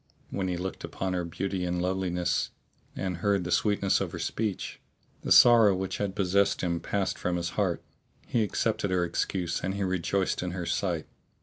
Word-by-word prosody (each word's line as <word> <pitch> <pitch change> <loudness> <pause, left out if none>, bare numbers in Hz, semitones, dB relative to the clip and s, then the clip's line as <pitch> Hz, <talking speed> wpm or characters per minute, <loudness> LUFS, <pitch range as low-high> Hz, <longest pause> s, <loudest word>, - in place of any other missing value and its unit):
When 95 -1 -1
he 90 -1 -1
looked 95 +2 -5
upon 95 -1 -3
her 90 -1 -1
beauty 95 +2 -3
and 90 0 -1
loveliness 90 -1 0 0.5
and 95 -3 -2
heard 100 +1 +1
the 90 - -4
sweetness 100 -1 +2
of - - -3
her - - -4
speech, 105 -3 -3 0.4
the - - -4
sorrow 115 -5 +8
which 95 0 -3
had 100 -2 -2
possessed 100 +1 +2
him 85 -2 0
passed 100 +2 -2
from 90 - -1
his 85 0 -1
heart; - - 0 0.4
he 120 - +1
accepted 100 -1 0
her 90 -1 +2
excuse 85 0 -2
and 95 +1 -1
he 100 - -1
rejoiced 95 +1 0
in 90 -1 -3
her 90 -2 -3
sight. - - -1
95 Hz, 185 wpm, -28 LUFS, 90-100 Hz, 0.5 s, sorrow